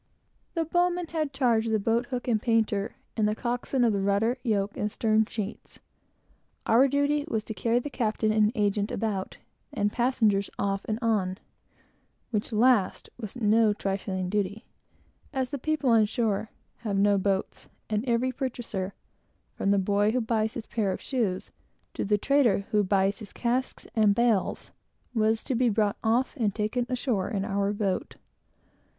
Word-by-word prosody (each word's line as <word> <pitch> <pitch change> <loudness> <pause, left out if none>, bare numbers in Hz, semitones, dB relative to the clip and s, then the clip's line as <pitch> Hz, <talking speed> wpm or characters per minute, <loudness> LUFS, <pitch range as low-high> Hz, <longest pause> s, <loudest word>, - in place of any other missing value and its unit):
The 330 -1 0
bow 350 +2 +2
man 355 0 -3
had 310 -3 -1
charge 240 -5 +2
of - - -1
the - - +4
boat 230 +4 0
hook 250 -2 -4
and 220 -3 +2
painter, 220 -3 +1 0.2
and 215 -2 +2
the 210 - 0
coxswain 245 +2 -1
of 230 -3 +3
the 200 - 0
rudder, 205 +6 +1
yoke, 205 -4 0
and 210 0 -2
stern 220 0 +2
sheets. 215 -2 -6 0.9
Our 245 +5 +5
duty 285 +2 +1
was 220 -7 -1
to 220 - -6
carry 230 +2 +1
the 280 +4 -2
captain 220 -3 0
and 215 0 +3
agent 205 -1 +1
about, 205 -4 -3 0.3
and 205 0 0
passengers 220 -5 +2
off 195 0 -1
and 215 - -1
on; 195 -5 +1 0.9
which 215 0 -1
last 225 -3 +2
was 215 -2 -7
no 220 -2 +3
trifling 195 -2 -3
duty, 205 +3 -2 0.7
as 260 -2 -1
the 285 - -3
people 300 -2 +1
on 220 -2 +5
shore 220 -2 -1 0.3
have 210 -4 -2
no 200 0 +4
boats, 190 0 -2 0.2
and 210 0 -1
every 240 +2 +2
purchaser, 235 -8 -4 0.6
from 195 - -1
the 200 - +4
boy 205 +2 +2
who 255 - +2
buys 220 -2 0
his 225 - -5
pair 210 -4 -1
of - - -3
shoes, 220 -9 -2 0.4
to - - -2
the 210 +1 +2
trader 240 -4 +2
who 210 -2 +3
buys 195 +1 +1
his 215 -3 -10
casks 250 +2 -2
and 210 -3 +4
bales, 230 -4 +1 0.4
were 220 -1 +3
to 225 - -4
be 245 0 +3
taken 210 -1 +2
off 235 +6 +1
and 220 -7 -1
on, 240 -1 -1
in 195 0 -1
our 200 -1 0
boat. 200 -2 -2
220 Hz, 170 wpm, -27 LUFS, 205-245 Hz, 0.9 s, Our